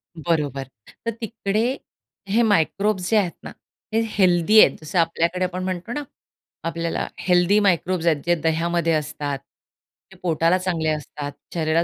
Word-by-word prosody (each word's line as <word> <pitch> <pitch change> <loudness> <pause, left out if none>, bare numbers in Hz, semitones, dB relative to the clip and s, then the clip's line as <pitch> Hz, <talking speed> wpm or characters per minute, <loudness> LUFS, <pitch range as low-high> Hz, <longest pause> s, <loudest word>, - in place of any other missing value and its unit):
बरोबर. 150 -5 -1 0.4
तर 230 - 0
तिकडे 220 -1 -1 0.7
हे 220 +4 +3
मायक्रोब्स 200 -1 +1
जे 225 - +4
आहेत 185 -5 +2
ना, - - -7 0.4
हे 225 - +3 0.2
हेल्दी 185 +2 +5
आहेत. - - +6
जसं 155 +3 -1
आपल्याकडे 170 +2 +1
आपण 185 0 -4
म्हणतो 185 +3 -4
ना, 295 - -3 0.6
आपल्याला 165 0 -2
हेल्दी 180 +3 +3
मायक्रोब्स 185 -3 +1
आहेत 155 -3 +2
जे 175 0 +3
दह्यामध्ये 165 +1 +1
असतात, 145 -2 -2 0.7
ते - - -15
पोटाला 165 +1 +2
चांगले 175 -4 -1
असतात, 150 -1 -4 0.2
शरीराला 160 0 +1
175 Hz, 140 wpm, -23 LUFS, 160-190 Hz, 0.7 s, आहेत